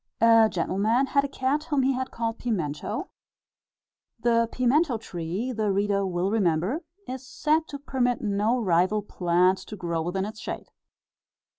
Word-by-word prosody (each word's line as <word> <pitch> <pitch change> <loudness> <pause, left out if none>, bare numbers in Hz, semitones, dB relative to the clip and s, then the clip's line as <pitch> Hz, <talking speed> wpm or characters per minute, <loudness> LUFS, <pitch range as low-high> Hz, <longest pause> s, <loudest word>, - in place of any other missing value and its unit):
A 225 -1 +6
gentleman 215 +8 +1
had 280 +1 +2
a - - -1
cat 275 +3 -1
whom 290 -5 +1
he 265 0 +2
called 230 -2 -4
"Pimento" 165 -12 -3 1.1
the 230 0 +2
pimento 255 +2 +2
tree, 185 +3 -4
the 215 -4 0
reader 200 0 +1
will 180 +2 -1
remember, 195 - +1 0.3
is 260 0 -5
said 310 +1 +1
to 285 - -6
permit 260 -4 0
no 215 +3 +1
rival 185 +1 +2
plant 180 0 +2
to 215 - -9
grow 170 -4 -2
within 185 +4 -2
its 215 +1 -7
shade. - - -6
220 Hz, 145 wpm, -26 LUFS, 185-255 Hz, 1.1 s, A